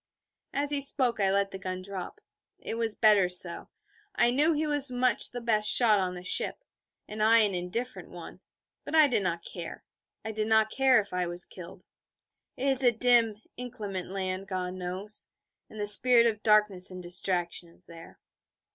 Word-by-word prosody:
As 285 +1 -2
he 285 -1 +1
spoke 260 -4 +2
I 195 -1 +1
let 200 0 0
the 190 - -8
gun 185 -1 -6
drop. 200 - -8 0.4
It - - -6
was 230 -2 -2
better 210 -5 +3
so. 180 -1 0 0.5
I 240 0 +2
knew 285 +5 +2
that 325 - +1
he 310 +1 -1
was 290 -2 +3
much 250 0 +1
the 245 - -7
best 215 -3 +1
shot 220 -4 +5
on 180 -1 -3
the 180 - -10
ship, 190 - +1 0.4
and 215 0 -7
I 225 +1 +4
an 205 -2 0
indifferent 185 +8 -5
one: - - -11 0.4
but - - -5
I 310 -2 +6
did 250 -6 0
not 170 -3 -4
care, 170 -2 -8 0.4
I 220 - -4
did 215 0 -3
not 220 -1 +2
care, 265 -3 +3
if 200 -3 -6
I 180 -1 -2
was 175 +1 -3
killed. 175 -2 -13 0.7
It 265 - -3
is 270 -1 +2
a 245 -2 +4
dim, 230 -2 +2
inclement 215 -7 -6
land, 190 0 -5
God 185 -2 -4
knows: 185 +3 -5 0.4
and 215 - -11
the 205 - -2
spirit 235 +3 +5
of 215 -2 -1
darkness 210 -4 +2
and 185 -1 -9
distraction 175 -1 0
is 170 +1 -9
there. 165 -1 -15
210 Hz, 190 wpm, -27 LUFS, 185-245 Hz, 0.7 s, I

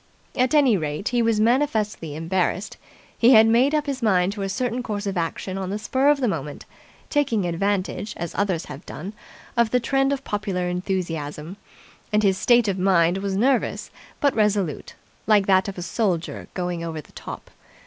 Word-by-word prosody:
At 255 +3 +2
any 270 -8 +5
rate, 150 +4 -3
he 240 -1 +1
was 225 -2 +2
manifestly 220 - 0
embarrassed. 180 +4 -1 0.4
He 240 +3 +5
had 220 -1 +8
made 245 +6 +3
up 300 -1 0
his 275 -2 -3
mind 190 -4 +2
to 205 - -6
a 195 - -2
certain 245 +3 -2
course 210 -3 -4
of 195 -1 -2
action 185 +3 -3
on 190 -1 -4
the 200 - -2
spur 260 +6 0
of 295 -1 +3
the 250 - +2
moment, 150 -7 -4 0.5
taking 235 - +1
advantage, 195 +4 -2
as 170 0 -5
others 190 -5 -1
have 150 +3 -9
done, 190 +7 -7 0.4
of 235 -2 +3
the 250 - +2
trend 270 +3 +1
of 275 -1 -2
popular 190 -5 -2
enthusiasm: 175 -3 -3 0.6
and 210 0 +2
his 190 -2 +2
state 240 -2 +4
of 190 -2 -1
mind 180 -1 +3
was 195 -1 -2
nervous 255 +3 0 0.3
but 285 -2 +2
resolute, 205 -7 0 0.3
like 210 -2 +4
that 190 0 +3
of 195 - -6
a 180 - -4
soldier 180 -5 -2
going 175 -2 -3
over 165 -2 -4
the 150 - -13
top. - - -9
200 Hz, 185 wpm, -23 LUFS, 180-235 Hz, 0.6 s, had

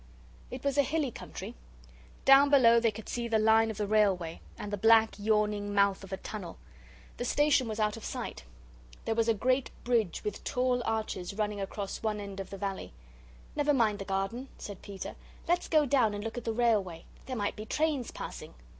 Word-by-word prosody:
It 255 0 -7
was 280 0 +1
a - - +9
hilly 285 -1 -1
country. - - -8 0.7
Down 275 +1 +7
below 235 -5 +6
they 230 0 +3
could 215 0 -8
see 240 -1 -3
the 225 -1 +2
line 220 +1 +4
of 220 - -5
the 210 - -1
railway, 195 -6 +1 0.2
and 210 -2 -6
the - - 0
black 225 +2 +5
yawning 210 -1 0
mouth 200 -1 +3
of 195 - -11
a 190 - -2
tunnel. 190 -3 -7 0.6
The - - -3
station 290 -1 +3
was 215 0 -4
out 210 0 +1
of 225 - -10
sight. - - -5 0.6
There 225 - +1
was 225 0 +1
a 230 - +3
great 255 +4 +1
bridge 230 -7 0
with 210 -1 -4
tall 250 0 +1
arches 215 -4 -2
running 210 -1 -2
across 195 0 -5
one 215 -1 -1
end 200 -1 -7
of 195 - -6
the 195 - -7
valley. 195 - -4 0.6
"Never 295 -1 +2
mind 220 -4 +2
the 195 - -5
garden," 195 +7 -2
said 200 -2 -8
Peter; 200 -2 -7 0.3
"let's 350 +1 +1
go 310 -2 +4
down 245 -6 +2
and 205 - -5
look 225 +2 -5
at 245 - -6
the 225 - 0
railway. 215 -8 +1 0.2
There 260 - -3
might 205 -3 -1
be 215 - -7
trains 300 -4 0
passing." - - -8
220 Hz, 200 wpm, -30 LUFS, 205-245 Hz, 0.7 s, a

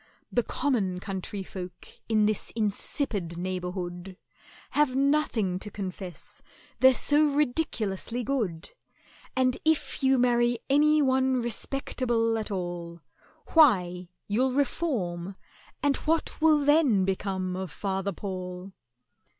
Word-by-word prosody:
"The 245 - +2
common 215 -9 -1
country 195 +1 -5
folk 180 -2 -8 0.2
in 215 -2 +3
this 215 -1 0
insipid 205 - -1
neighbourhood 180 0 -4 0.5
Have 295 -3 +2
nothing 270 -10 +1
to 210 - -7
confess, 190 -3 -7 0.4
they're 260 0 +7
so 295 +4 +3
ridiculously 245 -6 -1
good; 215 -11 -2 0.6
And 255 -1 +2
if 315 -1 0
you 265 0 +4
marry 240 -1 +3
any 300 +1 +5
one 260 0 +2
respectable 235 -1 0
at 215 - -5
all, 175 -3 -5 0.5
Why, 180 - +4 0.2
you'll 250 +5 +1
reform, 200 - -1 0.5
and 285 -1 +3
what 320 0 -1
will 305 -2 +4
then 285 -10 +4
become 190 -1 -2
of 190 -1 -4
FATHER 195 +2 -2
PAUL?" 185 0 -6
215 Hz, 110 wpm, -27 LUFS, 185-265 Hz, 0.6 s, they're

